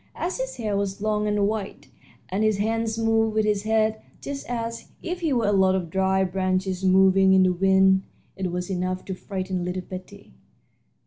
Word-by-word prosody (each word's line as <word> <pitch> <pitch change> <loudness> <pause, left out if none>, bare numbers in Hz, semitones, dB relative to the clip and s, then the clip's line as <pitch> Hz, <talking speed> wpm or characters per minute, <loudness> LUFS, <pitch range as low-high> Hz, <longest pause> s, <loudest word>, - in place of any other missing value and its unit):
As 360 +7 -3
his - - -3
hair 215 -4 -2
was 200 0 -2
long 210 0 0
and 205 -1 +1
white, 210 -2 -4 0.4
and 195 +4 -1
his 215 -2 +2
hands 225 +1 -1
moved 225 -1 +1
with 215 -1 +2
his 210 -2 +1
head, 220 0 +1 0.2
just 280 -2 -6
as 230 -1 -4 0.2
if 355 +1 -3
he 325 -4 -1
were 240 -4 +1
a 205 - +2
lot 190 -1 +3
of 175 -4 -3
dried 190 0 +1
branches 185 0 -1
moving 190 0 +5
in 190 0 +6
the 185 -1 +3
wind, 190 +1 +4 0.3
it 185 -2 -3
was 180 +2 -4
enough 185 0 -2
to 190 - -4
frighten 185 -1 -4
little 180 +1 -3
Betty. 185 - -10
195 Hz, 190 wpm, -24 LUFS, 185-220 Hz, 0.4 s, in